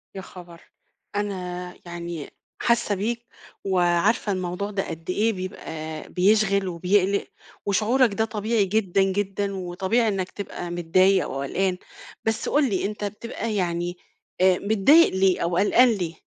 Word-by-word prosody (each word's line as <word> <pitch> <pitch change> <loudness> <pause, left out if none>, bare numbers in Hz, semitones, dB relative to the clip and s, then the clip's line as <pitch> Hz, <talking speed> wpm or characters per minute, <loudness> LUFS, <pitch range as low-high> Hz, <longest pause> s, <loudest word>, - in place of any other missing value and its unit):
يا 190 - -5
خبر! 175 -3 -12 0.5
أنا 180 -3 -3
يعني 170 -3 -6 0.3
حاسَّة 235 -3 +2
بيك 235 +4 -3 0.4
وعارفة 190 +3 +2
الموضوع 185 +2 -3
ده 195 -1 -2
قد 165 +1 -8
إيه 220 +5 +1
بيبقى 160 -5 -6
بيشغَل 200 +1 +3
وبيقلِّق، 185 +3 +1 0.4
وشعورَك 220 +4 +2
ده 220 +2 +1
طبيعي 220 -1 0
جدًا 195 -1 +1
جدًا، 200 +1 -1
وطبيعي 190 +5 0
إنَّك 195 -3 -1
تبقى 180 -3 -6
متضايِق 185 +3 +3
وقلقان. 180 +8 -1 0.5
بس 225 0 -1
قٌل 285 -3 +3
لي، 190 -1 -1
أنتَ 210 +1 -4
بتبقى 220 +1 -4
يعني 175 -1 -1 0.4
آآ، 185 -1 +5
متضايِق 220 - +5
ليه 190 -1 +3
أو 170 0 0
قلقان 235 +6 +5
ليه؟ 175 -5 -3
195 Hz, 135 wpm, -24 LUFS, 180-210 Hz, 0.5 s, آآ